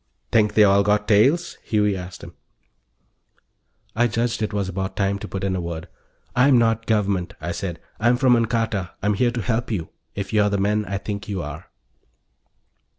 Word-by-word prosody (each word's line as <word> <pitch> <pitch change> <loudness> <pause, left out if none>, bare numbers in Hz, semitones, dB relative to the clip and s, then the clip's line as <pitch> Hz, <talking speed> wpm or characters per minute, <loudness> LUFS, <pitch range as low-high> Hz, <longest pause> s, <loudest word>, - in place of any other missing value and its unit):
"Think 105 -2 +3
they 110 - +7
all 100 0 +5
got 105 +1 +1
tails?" 135 +12 +3
Huey 105 -2 +1
asked 90 0 -8
him. - - -10 1.6
I 120 +2 +3
judged 115 +1 -1
it 110 - -1
was 100 -2 -1
about 95 +1 -4
time 100 0 0
to - - -7
put 95 -1 -5
in 95 -1 0
a 90 - -2
word. 85 -1 -5 0.5
"I'm 125 +1 +5
not 115 -1 +1
Government," 100 -5 0
I 85 +2 -4
said. 85 -1 -4 0.2
"I'm 120 +2 +3
from 130 -2 +4
Ancarta. 115 -5 -1
I'm 105 +1 +2
here 120 +4 +2
to 120 0 -3
help 120 +2 -1
you 95 -8 -3 0.3
if 100 0 -5
you're 105 -1 +4
the 100 - 0
men 105 +2 +1
I 100 -1 -3
think 105 +1 -5
you 95 -4 -3
are." 75 +3 -8
105 Hz, 185 wpm, -23 LUFS, 95-115 Hz, 1.6 s, they